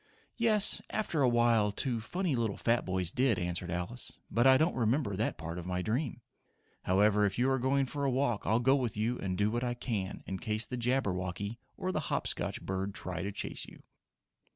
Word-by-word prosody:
"Yes, 215 -3 +4
after 190 -8 -1
a 130 - +5
while 120 -3 +3
two 120 +2 -2
funny 175 - -1
little 115 -4 -1
fat 115 0 +1
boys 90 -2 +1
did," 125 -3 +2
answered 90 0 -2
Alice. 90 +8 -4
"But 120 +3 +4
I 130 0 +8
don't 160 +4 +2
remember 115 -2 +1
that 110 +4 -1
part 85 +3 -5
of 90 - -7
my 90 0 -1
dream. 120 - -2 0.6
However, 105 +3 +4
if 100 -1 +1
you 130 +2 +2
are 130 - +1
going 135 +2 +2
for 140 +2 -4
a 140 - +2
walk 125 -4 +1
I'll 110 +2 +2
go 130 +3 +4
with 120 -7 -1
you 115 +3 0
and 90 -2 -2
do 105 +2 +2
what 120 +2 -1
I 120 -1 -1
can 105 -6 -3
in 95 -1 -4
case 110 -1 -1
the 125 - -5
Jabberwocky 100 -4 -1 0.2
or 185 - -2
the 170 - -1
Hop - - 0
Scotch - - -2
bird 95 +1 -3
try 90 -1 -4
to 100 +2 -3
chase - - -4
you." - - -15
115 Hz, 210 wpm, -31 LUFS, 95-130 Hz, 0.6 s, I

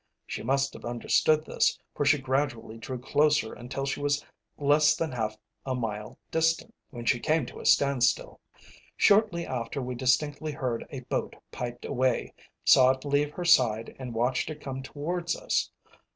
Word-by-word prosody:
She - - -5
must 135 +3 0
have - - -11
understood 150 +6 +2
this, - - +1 0.2
for 145 - -1
she 145 +1 +5
gradually 130 -4 -2
drew 125 +3 -5
closer 145 -1 +2
until 135 +3 -5
she 135 - -2
was 145 0 0 0.3
less 150 +1 +4
than 165 -1 -2
half 110 -3 -3 0.3
a 130 -1 -2
mile 105 -3 -4
distant, 165 +7 +1 0.2
when 120 -3 -8
she 120 - +2
came 155 0 +1
to - - -10
a - - -3
standstill. 140 -4 +2 0.6
Shortly 200 -5 +4
after 125 +2 -4
we 125 -1 -3
distinctly 145 +4 0
heard 125 -4 -3
a 135 - -6
boat 125 - -3 0.2
piped 120 0 -6
away, 130 -1 0 0.3
saw 130 -1 +7
it 130 +2 -1
leave 145 +1 +1
her 175 - -5
side, 115 -9 +3
and 125 -3 -6
watched 125 +6 0
it 155 -1 -6
come 135 -2 -5
towards 170 +6 -3
us. - - -1
135 Hz, 165 wpm, -28 LUFS, 120-150 Hz, 0.6 s, saw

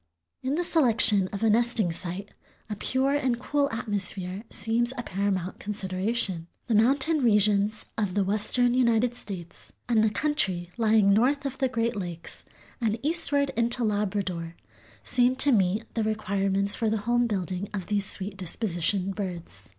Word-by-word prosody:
In 265 +3 -1
the 350 - 0
selection 225 - +3
of 200 +2 -6
a 225 - +4
nesting 230 -4 +3
site 180 +4 -2 0.4
a - - -2
pure 265 +6 0
and 260 -4 0
cool 285 +2 0
atmosphere 200 -4 0
seems 230 +3 +1
a 245 - -3
paramount 190 -2 -2
consideration. 190 -2 -2 0.2
The 235 - -1
mountain 275 +8 +2
regions 210 -1 +2
of 200 -4 -1
the 200 - +2
western 215 +5 +1
United 240 -1 +2
States 190 -8 -9 0.2
and 225 -3 +3
the 220 - +3
country 195 - -1
lying 220 -3 +3
north 275 +7 +2
of 265 -1 -4
the 265 -2 +1
great 230 -1 -1
lakes 175 -4 -6 0.4
and 220 -1 0
eastward 290 -3 +2
into 235 +1 +1
Labrador 195 -5 -2 0.5
seem 250 0 +2
to 270 +2 +4
meet 205 0 +1
the 225 - -1
requirements 200 -2 0
for 225 - -1
the 220 - 0
home 240 0 +2
building 190 -2 -3
of 195 -4 -5
these 205 -2 0
sweet 195 0 +1
dispositioned 185 0 -1
birds. 180 -4 -7
215 Hz, 155 wpm, -26 LUFS, 195-240 Hz, 0.5 s, a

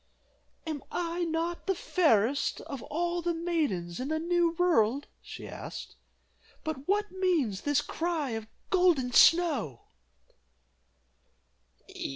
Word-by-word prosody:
"Am 310 -3 -4
I 345 0 -1
not 335 +2 -2
the 385 - +2
fairest 280 - +2
of 275 -6 -7
all 345 +5 -2
the 340 0 -1
maidens 300 - -1
in 255 - -3
the 315 +1 0
new 340 +1 +1
world?" 290 -7 +2 0.2
she - - -9
asked, - - -8 0.7
"but 300 -3 -5
what 415 +2 +1
means 340 - 0
this 290 0 +2
cry 325 -4 -2
of 225 -1 -4 0.2
'Golden 350 -9 +3
Snow? 280 - +4
325 Hz, 115 wpm, -29 LUFS, 265-345 Hz, 0.7 s, Snow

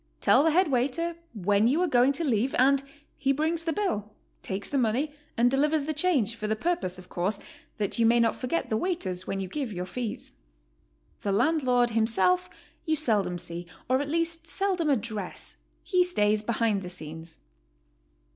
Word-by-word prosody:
Tell - - +5
the 325 - +4
head 325 0 +3
waiter 285 +7 0 0.2
when 205 +2 +2
you 280 +7 +2
are - - +2
going 250 -2 +4
to 335 - -3
leave 250 -2 +1
and 270 +2 +4 0.4
he 275 -1 +2
brings 315 +4 0
the 330 0 -1
bill, 215 - -2 0.3
takes 195 0 -4
the 280 - 0
money, 255 +6 0 0.2
and 245 +1 +4
delivers 295 +2 +2
the 310 +2 -2
change, 295 - +2
for 215 -2 -4
the 215 - +1
purpose, 285 - -1
of 185 0 -12
course, 190 +4 -2 0.4
that 205 +2 -1
you 230 - +5
may 235 +1 +4
not 230 -1 +3
forget 255 +3 -2
the 220 - +2
waiters 195 - -2
when 195 - -2
you 190 - -3
give 265 +4 -4
your 180 -2 -4
fees. 225 +4 -4 0.9
The 200 - -1
landlord 245 0 +2
himself 190 -5 +2 0.3
you 315 -2 +1
seldom 210 - +1
see, 170 0 -7 0.2
or 260 +2 +2
at 285 - -4
least 330 +1 -1
seldom 370 -4 +1
address; 215 -7 -3 0.3
he 365 -2 +3
stays 210 -12 +2
behind 220 -2 0
the 180 - -6
scenes. 160 -1 -6
240 Hz, 180 wpm, -27 LUFS, 205-310 Hz, 0.9 s, Tell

